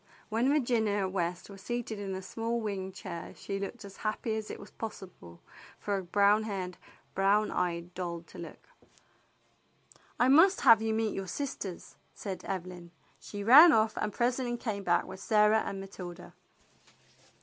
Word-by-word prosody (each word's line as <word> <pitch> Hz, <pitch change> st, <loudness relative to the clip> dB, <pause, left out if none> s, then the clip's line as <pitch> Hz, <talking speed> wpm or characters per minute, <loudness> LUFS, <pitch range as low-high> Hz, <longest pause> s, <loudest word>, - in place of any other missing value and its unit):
When 230 Hz, +4 st, +1 dB
Virginia 225 Hz, -8 st, +1 dB
West 180 Hz, -1 st, -3 dB
was 195 Hz, -1 st, -12 dB
seated 235 Hz, -1 st, -4 dB
in 200 Hz, -1 st, -4 dB
the 190 Hz, 0 st, -5 dB
small 230 Hz, +4 st, -2 dB
wing 195 Hz, -4 st, -4 dB
chair 175 Hz, -2 st, -7 dB
she 195 Hz, 0 st, -5 dB
looked 200 Hz, +3 st, -6 dB
as 195 Hz, -1 st, -11 dB
happy 220 Hz, +1 st, -2 dB
as 220 Hz, -1 st, -4 dB
it -, -, -7 dB
was 200 Hz, -, -12 dB
possible 185 Hz, -, -9 dB, 0.4 s
for 205 Hz, -, -2 dB
a 195 Hz, -, -2 dB
brown 200 Hz, +4 st, +3 dB
haired, 190 Hz, -4 st, -4 dB, 0.4 s
brown 200 Hz, +2 st, +2 dB
eyed 170 Hz, 0 st, -2 dB
doll 175 Hz, -2 st, -4 dB
to -, -, -13 dB
look. 170 Hz, -, -10 dB, 1.5 s
"I 245 Hz, -, +4 dB
must 330 Hz, +8 st, +6 dB
have 225 Hz, -1 st, +7 dB
you 220 Hz, 0 st, 0 dB
meet 220 Hz, -1 st, 0 dB
your 195 Hz, -1 st, -4 dB
sisters," 205 Hz, -5 st, -5 dB, 0.2 s
said 190 Hz, -3 st, -6 dB
Evelyn. 180 Hz, -2 st, -5 dB, 0.3 s
She 205 Hz, -1 st, -7 dB
ran 295 Hz, +10 st, +10 dB
off 220 Hz, -3 st, +3 dB
and 210 Hz, -, -2 dB
presently 245 Hz, 0 st, 0 dB
came 215 Hz, -4 st, -3 dB
back 175 Hz, -2 st, +2 dB
with 190 Hz, 0 st, -9 dB
Sarah 210 Hz, +1 st, +4 dB
and 195 Hz, -, -5 dB
Matilda. 180 Hz, -2 st, -9 dB
200 Hz, 160 wpm, -30 LUFS, 185-225 Hz, 1.5 s, ran